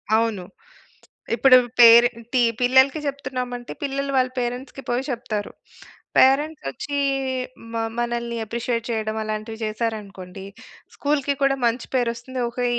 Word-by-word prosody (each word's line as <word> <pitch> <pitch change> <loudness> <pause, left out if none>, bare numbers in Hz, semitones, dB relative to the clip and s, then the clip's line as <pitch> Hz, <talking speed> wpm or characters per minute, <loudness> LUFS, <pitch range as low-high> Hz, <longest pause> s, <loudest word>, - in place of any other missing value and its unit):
అవును. 220 -5 0 0.9
ఇప్పుడూ 255 0 +7 0.2
పేరెంటీ 235 +1 +6 0.2
పిల్లలకి 265 +4 +4
చెప్తున్నామంటే, 250 -3 -4
పిల్లలు 275 0 -2
వాళ్ళ 255 0 +3
పేరెంట్స్‌కి 250 +3 -4
పోయి 245 +2 0
చెప్తారు. 230 -4 -3 0.7
పేరెంట్సొచ్చీ 285 - +2 0.8
మ - - -4 0.2
మనల్ని 235 0 -2
అప్రిషియేట్ 230 +1 -3
చేయడం, 220 -1 -2
అలాంటివి 215 +1 -5
జేశారనుకోండి, 205 -4 -5 0.5
స్కూలుకి 285 -1 0
కూడా 275 0 +3
మంచి 235 +1 0
పేరొస్తుంది. 245 +1 -2
ఓకే. 245 +1 -3
240 Hz, 105 wpm, -23 LUFS, 225-260 Hz, 0.9 s, ఇప్పుడూ